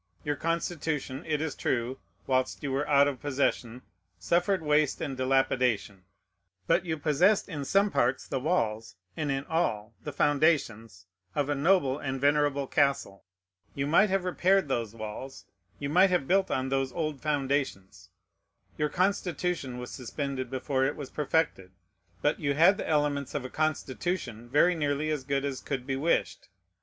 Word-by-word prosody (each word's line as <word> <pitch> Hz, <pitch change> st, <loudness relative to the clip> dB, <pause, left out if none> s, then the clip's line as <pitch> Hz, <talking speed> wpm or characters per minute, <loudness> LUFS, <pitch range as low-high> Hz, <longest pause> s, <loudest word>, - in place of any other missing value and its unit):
Your 145 Hz, 0 st, 0 dB
Constitution, 160 Hz, -4 st, -2 dB
it 150 Hz, -1 st, 0 dB
is 160 Hz, -2 st, -2 dB
true, 125 Hz, +1 st, -2 dB, 0.3 s
whilst 130 Hz, +1 st, 0 dB
you 140 Hz, -, -2 dB
were 140 Hz, +2 st, -1 dB
out 140 Hz, -1 st, +5 dB
of 140 Hz, -3 st, -3 dB
possession, 130 Hz, -4 st, -1 dB, 0.3 s
suffered 175 Hz, -, +1 dB
waste 150 Hz, -1 st, +2 dB
and 145 Hz, -4 st, -3 dB
dilapidation; 125 Hz, -7 st, 0 dB, 0.6 s
but 175 Hz, -, +2 dB
you 160 Hz, -2 st, -2 dB
possessed 165 Hz, +8 st, +3 dB
in 145 Hz, -3 st, -5 dB
some 200 Hz, +6 st, +3 dB
parts 125 Hz, +2 st, +1 dB
the 135 Hz, -, -2 dB
walls, 115 Hz, -, -1 dB, 0.2 s
and 150 Hz, -2 st, -2 dB
in 135 Hz, 0 st, -1 dB
all 115 Hz, -10 st, -1 dB
the 150 Hz, -, -4 dB
foundations, 130 Hz, -, +1 dB, 0.3 s
of 145 Hz, -1 st, 0 dB
a -, -, +2 dB
noble 145 Hz, -2 st, +2 dB
and 135 Hz, -2 st, -3 dB
venerable 145 Hz, 0 st, +2 dB
castle. 135 Hz, -8 st, 0 dB, 0.5 s
You 140 Hz, -, -1 dB
might 180 Hz, +8 st, +4 dB
have 195 Hz, -1 st, +1 dB
repaired 185 Hz, 0 st, +2 dB
those 115 Hz, -4 st, -2 dB
walls; 115 Hz, +5 st, -7 dB, 0.3 s
you 140 Hz, -, -4 dB
might 180 Hz, +6 st, +5 dB
have 175 Hz, -7 st, 0 dB
built 190 Hz, +1 st, +3 dB
on 130 Hz, 0 st, -1 dB
those 135 Hz, -1 st, 0 dB
old 155 Hz, -4 st, -3 dB
foundations. 140 Hz, -9 st, -2 dB, 0.7 s
Your 150 Hz, 0 st, +1 dB
Constitution 180 Hz, -7 st, -1 dB
was 125 Hz, 0 st, -7 dB
suspended 130 Hz, 0 st, -4 dB
before 130 Hz, +1 st, -1 dB
it 140 Hz, +2 st, 0 dB
was 140 Hz, -3 st, -8 dB
perfected; 150 Hz, -, -1 dB, 0.5 s
but 145 Hz, -, +1 dB
you 140 Hz, -2 st, 0 dB
had 175 Hz, +6 st, +5 dB
the -, -, -4 dB
elements 145 Hz, -3 st, 0 dB
of 140 Hz, -3 st, -2 dB
a 130 Hz, -, -7 dB
Constitution 140 Hz, -5 st, -2 dB
very 160 Hz, +7 st, +4 dB
nearly 150 Hz, -1 st, -1 dB
as 150 Hz, -3 st, -2 dB
good 140 Hz, +1 st, -1 dB
as 135 Hz, -2 st, -3 dB
could 130 Hz, -3 st, -4 dB
be 135 Hz, 0 st, -2 dB
wished. 155 Hz, +5 st, 0 dB
140 Hz, 160 wpm, -28 LUFS, 130-155 Hz, 0.7 s, out